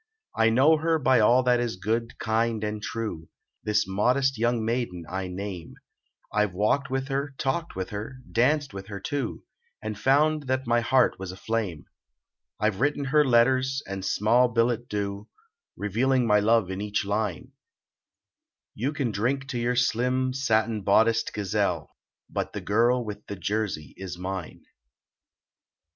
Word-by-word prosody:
I 115 0 +4
know 135 +8 +5
her 160 +1 +1
by 130 -4 +3
all 120 +4 +5
that 125 -1 +3
is 120 -4 -1
good, 115 +5 -2
kind 110 0 0
and 105 0 -3
true, 105 -9 -5 0.3
This 105 -1 +1
modest 125 +8 +2
young 120 0 0
maiden 115 -8 -2
I 95 0 -3
name; 90 -2 -6 0.6
I 105 - +3
ve 95 - -13
walked 125 +9 +1
with 135 0 -2
her, 135 0 -2
talked 165 +6 -2
with 95 0 -4
her, 105 +5 -5 0.2
Danced 140 +2 +2
with 95 -1 -7
her, 100 -2 -6
too, 135 +4 -3 0.4
And 110 0 -5
found 150 +3 +2
that 130 0 0
my 120 0 +3
heart 125 0 +3
was 95 -1 -5
aflame; 95 -4 -3 0.7
I 110 +1 +2
ve 95 - -11
written 145 +2 +1
her 150 -1 +6
letters, 130 +2 +3
and 95 -1 -5
small 115 +6 +3
billet 120 0 0
doux, 100 0 -3 0.5
Revealing 125 +5 +1
my 105 -2 +4
love 110 -2 +2
in 95 +1 -4
each 105 -1 -1
line: 100 -2 -2 1.2
You 130 +7 -2
can 135 -5 -1
drink 130 +7 -1
to 120 - -2
your 120 +1 0
slim, 125 +2 +1
satin 110 -4 +1
bodiced 110 +4 +3
gazelle, 100 -3 -1 0.3
But - - -4
the - - -4
girl 120 +4 +2
with 105 -1 -7
the 100 - -5
jersey 95 -6 -3
is 95 -2 -6
mine. 95 -1 -6
115 Hz, 155 wpm, -26 LUFS, 105-130 Hz, 1.2 s, her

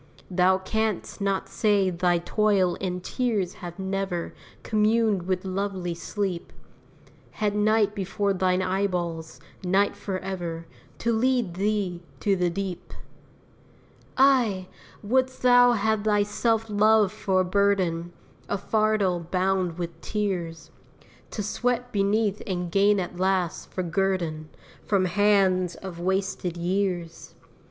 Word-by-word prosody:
Thou 185 +1 +4
canst 215 +1 -2
not 195 -1 0
say 205 -3 +2
thy 175 0 +2
toil 190 0 +1
and 180 -1 -3
tears 215 -8 -1
have 175 -1 -7
never 190 -2 -3 0.3
Communed 215 -3 +2
with 185 0 -1
lovely 190 -2 -2
sleep! 180 +1 -4 0.8
Had 210 -1 -1
night 210 0 +3
before 200 0 -1
thine 185 0 +1
eyeballs 180 -4 -2 0.2
night 190 +3 +2
forever 185 -4 -4 0.3
To 235 0 0
lead 240 -4 +1
thee 195 -2 -1 0.2
to 200 -2 +2
the 180 -1 +1
deep! 190 0 -5 1.2
Ay! 240 -9 +3 0.4
wouldst 260 +4 0
thou 245 -1 +6
have 220 -1 0
thy 210 -1 +3
self 225 +2 0
love 215 -1 +4
for 190 -2 +1
a - - 0
burden, 185 -3 +1 0.4
A 205 - 0
fardel 215 -3 +1
bound 185 -2 0
with 170 -2 -6
tears, 170 -6 -3 0.6
To 210 - -4
sweat 245 +3 -1
beneath 205 0 +1
and 180 -3 -3
gain 200 +2 +4
at 180 -1 -5
last, 185 -2 0
for 185 - -2
guerdon, 170 -3 -1 0.3
From 195 -3 +1
hands 190 -2 +2
of 185 -3 -8
wasted 190 -1 -1
years? 175 -1 -2
195 Hz, 120 wpm, -26 LUFS, 180-210 Hz, 1.2 s, thou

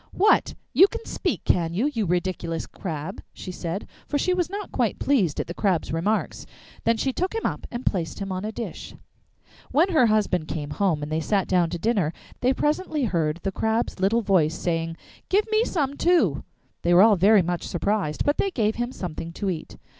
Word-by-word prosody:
'What! 420 +3 +3 0.2
You 380 - +8
can 465 +2 -7
speak, - - -2
can 170 -1 +1
you, 260 +10 +1
you 220 -5 -1
ridiculous 175 -2 -1
crab?' 165 0 -6
she 185 - -7
said, 175 +2 -4 0.2
for 290 - 0
she 365 +6 +1
was 355 -1 0
not 405 +2 -5
quite - - 0
pleased 200 - +1
at - - -1
the 170 - -6
Crab's 180 -5 0
remarks. 200 +7 -1 0.4
Then 230 0 +3
she 265 +3 0
took 370 - -2
him 450 - -2
up - - -2
and 240 +1 -6
placed 175 -5 -1
him 195 -1 -4
on 185 +1 -3
a 215 - -3
dish. 230 - -7 0.7
When 335 +6 +3
her 310 -10 +4
husband 205 -7 +1
came 145 -2 -4
home 165 -3 0
and 150 - -5
they 155 - +1
sat 195 +4 0
down 180 -3 +2
to 175 - -3
dinner, 185 -4 +1 0.3
they 250 - +3
presently 300 +2 0
heard 165 -7 0
the 195 - -1
Crab's 220 +1 -1
little 215 +5 +2
voice 165 -6 +3
saying, 165 -1 -2 0.3
'Give 410 +3 +3
me 435 +1 +4
some 285 - -1
too.' 350 +3 +3 0.4
They 175 0 +3
were 185 - +8
all 220 -1 +6
very 200 +2 +5
much 175 0 -2
surprised, 190 -4 -1
but 290 - +2
they 395 - +2
gave 220 - 0
him 240 +1 -2
something 170 -6 -6
to 195 +1 -2
eat. 160 -3 -7
200 Hz, 205 wpm, -25 LUFS, 170-260 Hz, 0.7 s, You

